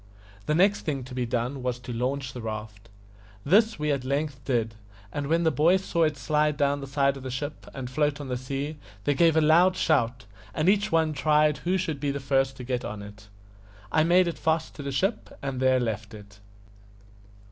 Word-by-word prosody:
The 150 - +2
next 195 +4 +3
thing 140 -4 -3
to 130 +1 -10
be 125 -1 -2
done 125 +3 -2
was 125 -1 -2
to 125 0 -7
launch 130 +2 -2
the 125 - -7
raft. 110 -2 -7 0.6
This 215 +7 +4
we 150 0 0
at 140 -2 -1
length 140 0 -2
did, 115 -4 0 0.4
and 145 -1 -3
when 165 +3 +2
the 160 - +3
boys 175 +6 +3
saw 170 -2 +2
it 155 -2 -1
slide 150 +3 +1
down 145 -1 +1
the 135 - -6
side 140 0 +1
of - - -9
the 130 - -6
ship 145 +4 -5
and 130 -2 -6
float 145 +2 0
on 145 - -6
the 125 - -2
sea, 135 +4 -4 0.3
they 145 - +2
gave 165 +2 +4
a - - +5
loud 175 +4 +5
shout, 125 - +1 0.3
and 155 - 0
each 205 +2 +3
one 160 -1 +2
tried 150 +1 +2
who 185 +2 0
should 160 -6 -2
be 145 0 -1
the 140 0 -2
first 135 -1 0
to 125 - -7
get 125 0 -2
on 105 -1 -6
it. 105 0 -12 0.6
I 155 - +4
made 175 +2 +4
it 170 - -4
fast 160 0 0
to - - -8
the 140 0 -4
ship, 195 - -2
and 135 -2 -4
there 130 0 +3
left 115 -2 -3
it. 105 -1 -14
140 Hz, 215 wpm, -26 LUFS, 125-155 Hz, 0.6 s, a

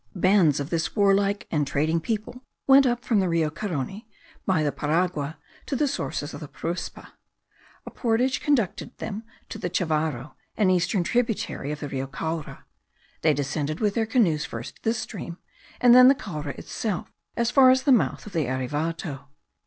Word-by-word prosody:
Bands 185 -5 +4
of 140 +2 -4
this 165 -1 -1
warlike 200 -1 +2
and 150 -3 +1
trading 155 +4 +1
people 220 +7 -4 0.2
went 270 0 +7
up 240 0 -1
from 220 -4 +2
the 185 -2 +1
Rio 165 -2 +1
Carony, 190 - -4 0.4
by 180 -5 +2
the 145 - +1
Paragua, 160 -1 -1 0.3
to 280 - -2
the 290 +3 +2
sources 150 - -3
of 145 - -7
the 150 - -8
Paruspa. 170 +5 -5 0.8
A - - -8
portage 245 +2 0
conducted 255 -11 0
them 215 -1 -5 0.3
to 220 - -6
the 180 - -2
Chavarro, 155 -6 -1 0.2
an 200 -4 +4
eastern 180 +1 +1
tributary 230 - -1
stream - - -2
of 150 - -7
the 145 - -4
Rio 135 0 -3
Caura; 160 +3 -5 0.6
they 155 -2 +3
descended 145 +2 -2
with 210 -2 +1
their 225 -1 0
canoes 185 -11 +2
first 115 0 -7
this 225 +1 0
stream, 180 -6 -6 0.4
and 245 -1 +6
then 250 0 +9
the 275 - +7
Caura 155 - -6
itself 210 -6 -4 0.2
as 235 0 +1
far 265 -2 +7
as 260 0 +4
the 280 - +3
mouth 245 - +2
of 210 - -10
the 160 -6 0
Erevato. 145 +3 -3
180 Hz, 175 wpm, -25 LUFS, 150-225 Hz, 0.8 s, then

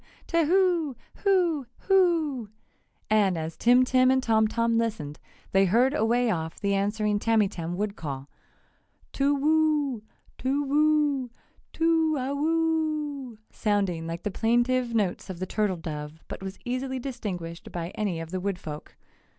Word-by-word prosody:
And 335 - +1 1.7
as 160 0 -4
Tim 245 +2 +5
Tim 255 0 +4
and 260 0 +3
Tom 220 -2 +3
Tom 230 +1 +1
listened, 165 -11 -3 0.3
they 195 0 +4
heard 240 +8 +3
away 240 -3 +2
off 160 -3 -3
the 200 -1 0
answering 205 +1 0
Tamytam 195 -7 0
wood 205 +1 -2
call: 140 -5 -6 0.9
"Toowoo 290 -2 +2 0.4
toowoo 285 0 +2 0.4
tooawoooooo!" 310 -3 0
sounding 195 -6 0
like 165 0 -5
the 210 - -2
plaintive 240 +3 +1
notes 200 -3 -1
of 185 - -5
the 185 - -3
turtle 205 -1 0
dove 155 -1 -7
but - - -7
was 190 0 -6
easily 260 +2 -2
distinguished 195 -10 -6
by 170 -1 -4
any 200 -6 -2
of 165 0 -7
the 185 - -2
woodfolk. 180 -6 -5
230 Hz, 120 wpm, -27 LUFS, 190-280 Hz, 1.7 s, Tim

